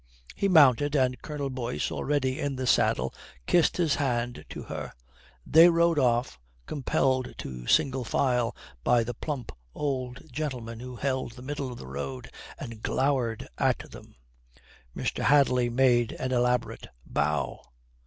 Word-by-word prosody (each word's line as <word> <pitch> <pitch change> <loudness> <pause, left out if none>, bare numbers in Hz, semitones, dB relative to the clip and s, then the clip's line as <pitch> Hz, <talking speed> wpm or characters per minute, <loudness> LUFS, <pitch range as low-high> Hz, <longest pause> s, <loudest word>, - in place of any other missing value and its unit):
He 200 - +1
mounted, 145 -4 +5
and 130 -2 +1
Colonel 145 -3 -4
Boyce, 125 -1 -3
already 135 -2 -1
in 140 -1 -2
the 130 0 -3
saddle, 65 - +2 0.3
kissed 175 -2 +3
his 165 -5 +2
hand 120 -4 -1
to - - -7
her. - - -6 0.5
They 165 +2 +7
rode 170 -2 +3
off, 120 - +1 0.3
compelled 130 -2 0
to 60 -2 -7
single 130 -1 +2
file 125 -1 +1 0.3
by 120 -1 +4
the 120 +2 -4
plump 140 -5 -5 0.2
old 130 -3 -3
gentleman 125 -6 -4
who 125 +1 -8
held 130 -2 -2
the 125 +1 -12
middle 140 -1 -4
of 120 - -8
the - - -9
road 70 -1 -6 0.3
and 115 -2 -8
glowered 130 -5 0
at - - 0
them. - - -13 0.8
Mr. - - -2
Hadley 125 -4 +4
made 120 -2 +3
an 130 0 -4
elaborate 125 -1 0 0.2
bow. 75 -4 -1
130 Hz, 145 wpm, -27 LUFS, 120-140 Hz, 0.8 s, They